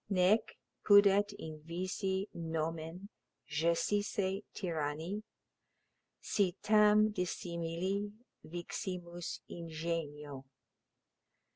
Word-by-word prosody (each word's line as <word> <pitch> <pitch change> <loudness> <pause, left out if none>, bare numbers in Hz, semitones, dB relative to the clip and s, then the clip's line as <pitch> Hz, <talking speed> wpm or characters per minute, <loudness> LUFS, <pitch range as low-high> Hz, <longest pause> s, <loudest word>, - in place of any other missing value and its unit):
Nec 195 +3 +3 0.3
pudet 205 0 +7
invisi 185 +5 -3
nomen 165 +3 -3 0.4
gessisse 190 +5 +1
tyranni, 165 +2 -2 1.0
Si 195 -4 +1
tam 210 0 +6
dissimili 180 +2 -2 0.3
viximus 175 0 -5
ingenio. 155 -4 -4
175 Hz, 55 wpm, -34 LUFS, 165-200 Hz, 1.0 s, pudet